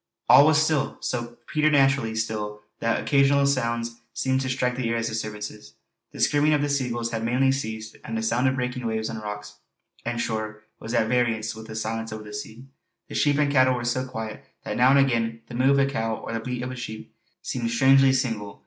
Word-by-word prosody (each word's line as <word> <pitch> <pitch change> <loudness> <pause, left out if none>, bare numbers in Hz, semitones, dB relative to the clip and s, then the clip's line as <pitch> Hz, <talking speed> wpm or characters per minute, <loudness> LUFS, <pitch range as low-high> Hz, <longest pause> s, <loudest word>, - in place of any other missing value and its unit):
All 145 - +8
was 155 -2 +5
still, 155 -3 +1
so 120 -1 -4
preternaturally 135 -6 +2
still 105 -1 -3 0.2
that 115 0 +1
occasional 140 0 +3
sounds 115 -3 -1
seemed 130 0 0
to 130 - -2
strike 125 -1 0
the 125 -2 -2
ear 115 0 0
as 115 0 -1
disturbances. 105 -8 -6 0.4
The - - -11
screaming 145 +1 +3
of 145 - 0
the 145 - 0
seagulls 120 -4 -1
had 115 -1 -3
mainly 130 +3 +2
ceased, 110 -4 -4
and 115 - -4
the 110 - -2
sound 120 +4 +2
of 130 - +1
breaking 125 -1 -3
waves 110 0 -2
on 110 - -5
rocks 105 0 -7 0.4
and 120 0 -3
shore 110 -1 -3 0.2
was 115 +2 -4
at 115 -2 +2
variance 115 -2 0
with 110 0 -10
the 110 - -8
silence 110 0 -3
over 110 0 -6
the 105 0 -10
sea; 110 +4 -7 0.4
the - - -8
sheep 145 -1 +2
and 145 -1 +2
cattle 130 -2 +4
were 120 -1 -4
so 125 +2 0
quiet 110 -3 -6 0.2
that - - -4
now 125 +1 +5
and 140 - +6
again 115 -4 +1
the - - -9
"moo" 130 +3 +3
of 140 - +4
a 140 - +4
cow 115 -5 -1
or - - -7
the 115 - -1
bleat 125 +1 -4
of 125 - -4
a - - -6
sheep 115 -3 -7 0.3
seemed 120 -2 -2
strangely 135 +3 +5
single. 115 -6 -2
120 Hz, 220 wpm, -25 LUFS, 110-135 Hz, 0.4 s, All